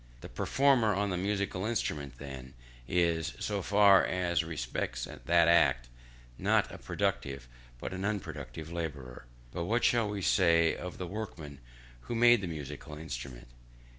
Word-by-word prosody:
The -, -, -9 dB
performer 130 Hz, -7 st, +2 dB
on 100 Hz, 0 st, 0 dB
the -, -, -1 dB
musical 100 Hz, 0 st, -1 dB
instrument 75 Hz, -, -2 dB
then 65 Hz, -2 st, -9 dB, 0.3 s
is, 85 Hz, 0 st, +1 dB
so 100 Hz, -2 st, -2 dB
far 100 Hz, 0 st, +6 dB
as 85 Hz, -3 st, 0 dB
respects 60 Hz, -6 st, -3 dB
that 85 Hz, -1 st, +2 dB
act, 65 Hz, -8 st, +4 dB, 0.5 s
not -, -, +2 dB
a -, -, -9 dB
productive, 70 Hz, -3 st, -2 dB, 0.3 s
but -, -, -6 dB
an 95 Hz, 0 st, -4 dB
unproductive 80 Hz, -, -4 dB
labourer. 70 Hz, -8 st, -6 dB, 0.3 s
But 85 Hz, -1 st, -3 dB
what 115 Hz, +6 st, +1 dB
shall 115 Hz, -3 st, +3 dB
we 100 Hz, -2 st, -4 dB
say 85 Hz, -4 st, +4 dB
of 90 Hz, -1 st, -7 dB
the 90 Hz, -, -4 dB
workman 85 Hz, -8 st, -7 dB, 0.4 s
who 90 Hz, -, -6 dB
made 120 Hz, -1 st, +6 dB
the 95 Hz, -, -3 dB
musical 75 Hz, -1 st, -7 dB
instrument? 60 Hz, -5 st, -7 dB
85 Hz, 145 wpm, -31 LUFS, 70-100 Hz, 0.5 s, far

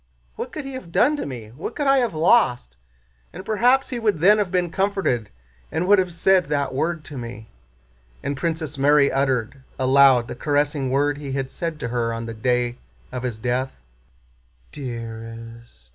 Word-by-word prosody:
What -, -, -5 dB
could 300 Hz, -, -6 dB
he 270 Hz, -, -6 dB
have 260 Hz, -10 st, -8 dB
done 285 Hz, -, +3 dB
to -, -, -4 dB
me? 120 Hz, -6 st, -7 dB
What 145 Hz, -, -7 dB
could 290 Hz, -, -2 dB
I 275 Hz, 0 st, +5 dB
have 235 Hz, -9 st, -1 dB
lost? 155 Hz, -, +3 dB, 0.6 s
And 190 Hz, -, -9 dB
perhaps 245 Hz, +5 st, +3 dB
he 245 Hz, -, -3 dB
would 210 Hz, -6 st, +1 dB
then 205 Hz, +6 st, +5 dB
have 200 Hz, -4 st, -1 dB
been 180 Hz, -2 st, 0 dB
comforted 190 Hz, -, 0 dB, 0.4 s
and 160 Hz, +3 st, -1 dB
would 205 Hz, 0 st, +6 dB
have 185 Hz, -1 st, 0 dB
said 180 Hz, +1 st, +3 dB
that 145 Hz, -2 st, -1 dB
word 160 Hz, +3 st, -1 dB
to 145 Hz, -4 st, -8 dB
me." 115 Hz, -2 st, -8 dB, 0.7 s
And 140 Hz, -, -2 dB
Princess 160 Hz, -2 st, -3 dB
Mary 145 Hz, 0 st, +4 dB
uttered 135 Hz, -1 st, 0 dB, 0.2 s
aloud 130 Hz, -2 st, +5 dB
the -, -, -5 dB
caressing 145 Hz, -2 st, 0 dB
word 145 Hz, +2 st, +1 dB
he 140 Hz, -2 st, -5 dB
had 135 Hz, -1 st, -3 dB
said 165 Hz, -3 st, -4 dB
to 120 Hz, -, -3 dB
her 115 Hz, -1 st, -1 dB
on 115 Hz, 0 st, -5 dB
the 115 Hz, -, -5 dB
day 120 Hz, +2 st, 0 dB, 0.3 s
of 125 Hz, -1 st, -4 dB
his 125 Hz, -3 st, -3 dB
death. 125 Hz, +3 st, -1 dB, 1.0 s
"Dear 115 Hz, -5 st, -6 dB, 0.4 s
est!" 60 Hz, -, -16 dB
140 Hz, 185 wpm, -23 LUFS, 125-180 Hz, 1.0 s, would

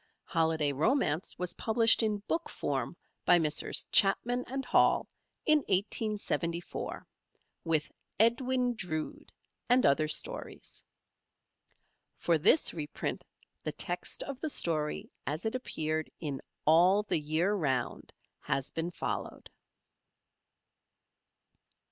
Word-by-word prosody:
"Holiday 160 Hz, -3 st, +1 dB
Romance" 155 Hz, -, 0 dB
was 180 Hz, -1 st, -3 dB
published 225 Hz, +1 st, +4 dB
in 210 Hz, -2 st, -1 dB
book 335 Hz, +1 st, -1 dB
form -, -, -3 dB, 0.3 s
by 175 Hz, -, +6 dB
Messrs 155 Hz, -3 st, +1 dB
Chapman 245 Hz, +5 st, +3 dB, 0.2 s
& -, -, -12 dB
Hall -, -, +3 dB, 0.4 s
in 305 Hz, -1 st, +5 dB
1874, 200 Hz, -5 st, -1 dB, 0.6 s
with 160 Hz, -2 st, 0 dB, 0.3 s
"Edwin 250 Hz, +2 st, +2 dB
Drood" 160 Hz, -8 st, -4 dB, 0.4 s
and 250 Hz, +1 st, +5 dB
other 155 Hz, +3 st, +3 dB
stories. 155 Hz, -, -1 dB, 1.3 s
For 170 Hz, -2 st, +1 dB
this 300 Hz, -, +4 dB
reprint 150 Hz, -3 st, -4 dB, 0.4 s
the -, -, -3 dB
text -, -, -2 dB
of 275 Hz, -2 st, -6 dB
the 315 Hz, -, -3 dB
story 155 Hz, -, -1 dB, 0.2 s
as 155 Hz, +6 st, -3 dB
it 220 Hz, -, -1 dB
appeared 155 Hz, -11 st, -2 dB
in 145 Hz, -4 st, -4 dB, 0.2 s
"All 180 Hz, +6 st, +5 dB
the 205 Hz, -, 0 dB
Year 160 Hz, +6 st, 0 dB
Round" 135 Hz, -10 st, -2 dB, 0.3 s
has 135 Hz, 0 st, -2 dB
been 165 Hz, +1 st, -2 dB
followed. 175 Hz, -, -5 dB
175 Hz, 105 wpm, -31 LUFS, 155-225 Hz, 1.3 s, by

